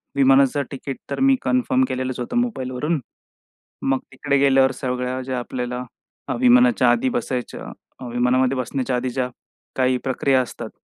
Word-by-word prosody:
विमानाचं 135 +1 +4
तिकीट 135 0 -6
तर - - -2
मी 270 0 +5
कन्फर्म 260 +1 +2
केलेलंच 130 -1 -3
होतं 125 - -3
मोबाईलवरून. 150 - -1 0.8
मग 135 -1 +1
तिकडे 140 +1 0
गेल्यावर 135 -1 +4
सगळ्या 125 0 -3
ज्या 130 -1 -3
आपल्याला 125 0 -4 0.6
विमानाच्या 245 - +5
आधी 120 +2 +1
बसायच्या 125 +1 -3 0.4
अ, 130 - -8
विमानामध्ये 125 +2 +2
बसण्याच्या 130 0 -2
आधी 125 +1 -1
ज्या 125 0 -2 0.5
काही 130 -1 +2
प्रक्रिया 130 0 +2
असतात. 120 -2 -7
130 Hz, 140 wpm, -22 LUFS, 125-140 Hz, 0.8 s, मी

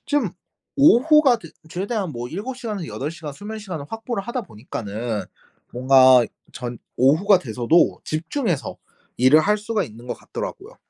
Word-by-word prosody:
좀 285 - 0 0.5
오후가 280 -2 +6
됐 - - -12 0.2
최대한 195 -1 -2
뭐 120 +1 -5
7 230 - -5
시간에서 210 -9 -5
8 145 +3 -4
시간 165 -4 -8
수면시간을 205 -5 -7
확보를 225 -1 -4
하다 235 +3 -4
보니까는 110 - -5 0.5
뭔가 130 -1 +6 0.3
전 120 -2 -6 0.2
오후가 170 +10 +4
돼서도 125 +3 +2
집중해서 165 - -2 0.4
일을 130 +5 +6
할 210 +5 +2
수가 215 -1 -1
있는 120 0 -12
것 - - -3
같더라고요. - - -7
170 Hz, 305 characters per minute, -22 LUFS, -, 0.5 s, 오후가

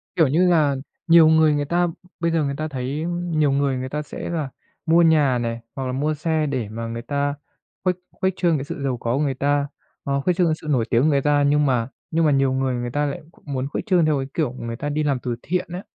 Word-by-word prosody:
Kiểu 160 -4 +4
như 170 +7 +3
là, 150 -5 +3 0.3
nhiều 165 -1 +7
người 160 -1 +5
người 145 0 0
ta 175 +3 +1 0.3
bây 170 0 +1
giờ 165 -2 +1
người 140 -1 -2
ta 155 0 -2
thấy 140 +3 -3
nhiều 170 -5 0
người 140 -1 +1
người 130 +1 -4
ta 150 +2 -3
sẽ 150 - -7
là 155 -5 -2 0.4
mua 165 +1 +5
nhà 150 -6 +4
này 115 -1 -2 0.2
hoặc 135 -1 -3
là 130 - -2
mua 150 +4 0
xe 155 0 0
để 130 -7 -2
mà 115 +1 -5
người 115 +1 -5
ta 145 +3 -1 0.5
khuếch 180 -1 +2 0.2
khuếch 190 -1 -1
trương 170 -5 +2
cái 135 - -4
sự 140 - -6
giàu 130 -3 -1
có 115 +1 -1
của 150 - +1
người 135 -2 0
ta, 145 +2 0 0.4
hoặc 140 0 0
khuếch 180 -2 +2
trương 180 -2 +3
cái 155 - +1
sự 155 - -9
nổi 125 -6 +2
tiếng 120 +1 +3
của 155 - +3
người 140 -3 +3
ta. 145 0 +2
Nhưng 145 +1 +3
mà 125 -3 +1 0.2
nhưng 165 0 +2
mà 150 - +4
nhiều 135 -1 +2
người 130 -1 0
người 120 0 -3
ta 145 +2 0
lại 140 - -4 0.2
muốn 135 -2 -3
khuếch 145 - -4
trương 180 -6 +3
theo 150 -2 +2
cái 135 - -3
kiểu 150 -7 0
người 115 -2 -5
ta 145 +5 -4
đi 150 +1 -1
làm 140 -4 0
từ 120 -1 -3
thiện 180 +3 -1
á. 185 - -5
145 Hz, 265 wpm, -22 LUFS, 130-160 Hz, 0.5 s, nhiều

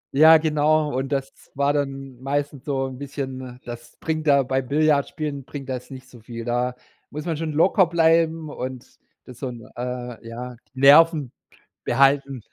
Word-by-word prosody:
Ja, 160 +3 +8
genau 155 -1 +1
und 135 +2 -2
das 135 -1 -4
war 140 +1 +2
dann 135 -3 -4
meistens 140 0 -3
so 135 -2 -1
'n 130 -1 -7
bisschen 130 -3 -6
das 120 0 -9
bringt 155 -1 -3
da 140 -1 +5
bei 130 +1 0
Billardspielen 145 +1 0
bringt 135 +1 -8
das 125 -1 -5
nicht 130 -1 -10
so 125 -2 -15
viel. 115 +1 -8
Da 125 +1 -1 0.3
muss 150 +1 -7
man 165 -2 -1
schon 160 +1 -3
locker 180 +5 +4
bleiben 165 -1 +2
und 130 -3 -6 0.4
das 125 - -12
so 135 - -3
'n, 120 -3 -9
äh 125 -2 -6
ja, 125 +2 -7 0.2
die - - -8
Nerven 150 -1 +6 0.5
behalten. 135 0 +2
135 Hz, 170 wpm, -23 LUFS, 125-150 Hz, 0.5 s, Ja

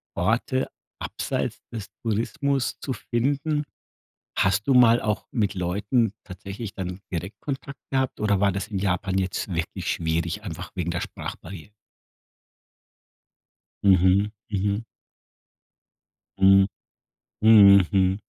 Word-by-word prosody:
Orte 125 +3 0 0.3
abseits - - -3
des 110 -3 -5 0.2
Tourismus 130 +5 -1
zu 130 - -3
finden. 140 +7 -1 0.7
Hast 95 +5 +2
du 135 - +4
mal 120 -2 +6
auch 105 -1 -2
mit 105 -4 0
Leuten 100 +5 0
tatsächlich 100 +3 -7
dann 90 0 -5
direkt 90 +3 -5
Kontakt 140 -1 -5
gehabt 130 -1 0
oder 105 -2 +2
war 100 0 +3
das 100 +2 -4
in 100 -3 -2
Japan 95 0 0
jetzt 95 0 -2
wirklich 85 +2 -3
schwierig, 85 +4 -2
einfach 90 -1 -7
wegen 85 -2 -2
der 85 - -2
Sprachbarrie 90 +3 -8 2.1
Mhm. 95 +1 +4 0.2
Mhm. 100 +2 -1 1.5
Mhm. 95 0 +6 0.8
Mhm, 100 -3 +9
Mhm. 95 +1 +2
100 Hz, 110 wpm, -25 LUFS, 95-115 Hz, 2.1 s, Mhm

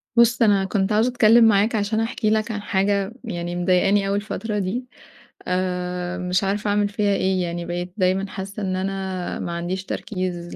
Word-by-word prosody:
بُص، 235 -1 +4
أنا 200 -4 +4
كنت 195 +1 0
عاوزة 220 +4 +3
أتكلّم 235 -1 +5
معاك 215 +1 +3
عشان 215 +1 0
أحكي 225 0 -1
لك 215 +1 +1
عن 210 -1 -4
حاجة 200 +1 0
يعني 175 -5 -4
مضايقاني 185 +3 +2
أوي 200 - 0
الفترة 210 +1 -3
دي. 205 +7 -2 0.6
آآ 180 0 -2
مش 180 +1 0
عارفة 205 +2 -1
أعمل 205 0 +2
فيها 205 0 +1
إيه، 190 -1 +1
يعني 170 0 -4
بقيت 175 +1 -4
دايمًا 190 +1 +1
حاسة 195 +2 -6
إن 185 -1 -1
أنا 190 -1 -3
ما 175 - -4
عنديش 175 +2 -3
تركيز 180 -5 -4
195 Hz, 175 wpm, -22 LUFS, 180-210 Hz, 0.6 s, أتكلّم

